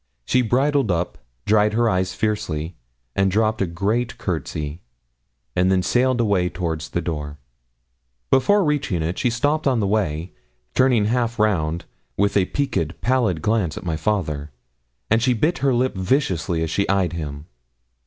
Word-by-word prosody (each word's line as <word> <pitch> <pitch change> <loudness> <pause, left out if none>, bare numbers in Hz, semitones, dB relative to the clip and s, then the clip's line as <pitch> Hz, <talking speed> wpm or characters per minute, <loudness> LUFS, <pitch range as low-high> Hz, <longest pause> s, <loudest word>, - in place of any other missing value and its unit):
She 125 - +3
bridled 135 +2 +2
up, 85 -4 -1 0.3
dried 105 0 +3
her 120 +1 +2
eyes 95 -3 0
fiercely, 85 -6 -2 0.4
and 95 0 +3
dropped 110 +2 +1
a 95 - +1
great 105 +8 -1
courtesy, 80 -3 -4 0.7
and 90 +1 +3
then 95 -1 +2
sailed 125 +3 +2
away 100 -6 +2
towards 80 -4 -3
the 85 - -2
door. 75 -3 -4 0.9
Before 205 +10 +4
reaching 140 - 0
it 85 +3 -2
she 125 - +2
stopped 145 +6 0
on 130 -3 +2
the 105 - +1
way, 90 -5 -1 0.4
turning 125 -5 +3
half 120 +1 0
round, 85 -6 +1 0.3
with 100 +1 +1
a 100 -2 +4
peaked, 85 - -2
pallid 115 -9 +1
glance 105 -7 0
at - - -7
my 80 -2 -1
father, 75 -5 -1 0.6
and 115 +1 +4
she 125 +1 +3
bit 155 +10 +1
her 135 -1 +2
lip 125 +1 +1
viciously 90 - 0
as 80 - -3
she 100 - 0
eyed 95 -3 +1
him. 75 -3 -5
100 Hz, 160 wpm, -22 LUFS, 85-120 Hz, 0.9 s, Before